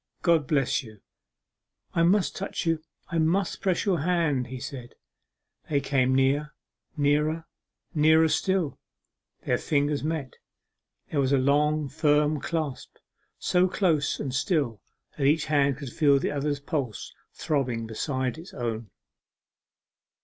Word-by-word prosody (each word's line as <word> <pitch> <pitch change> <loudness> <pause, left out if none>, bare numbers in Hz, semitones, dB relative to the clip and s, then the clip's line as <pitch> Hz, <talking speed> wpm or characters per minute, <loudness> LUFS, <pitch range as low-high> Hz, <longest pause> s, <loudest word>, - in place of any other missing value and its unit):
God 165 -5 +3
bless 140 -3 +1
you!' 110 -5 -13 0.9
'I 165 - +2
must 200 0 +2
touch 195 -2 -4
you, 165 -1 +1 0.3
I 170 - 0
must 175 +4 +1
press 185 -3 0
your 185 -5 +2
hand,' 155 -6 +1
he 130 +1 -7
said. 125 -2 -8 0.7
They 145 - +2
came 130 -2 +1
near 140 +3 +1 0.4
nearer 150 +3 +1 0.5
nearer 160 +1 +5
still 185 -1 0 0.7
their - - +1
fingers 145 -1 0
met. 155 -5 -3 0.7
There 150 - 0
was 135 -1 +2
a - - +5
long 150 +3 +2
firm 150 +1 +2
clasp, 155 -3 -4 0.4
so 180 +1 +2
close 170 -6 +1
and 135 -3 -3
still 135 - 0 0.4
that 135 - +3
each 150 +2 +3
hand 140 -3 +2
could 140 -4 -7
feel 145 -3 +4
the - - -1
other's 145 0 -1
pulse 140 -6 -4 0.2
throbbing 125 -6 -1
beside 130 +5 -2
its 175 +4 -12
own. 115 -3 -3
145 Hz, 135 wpm, -27 LUFS, 135-160 Hz, 0.9 s, nearer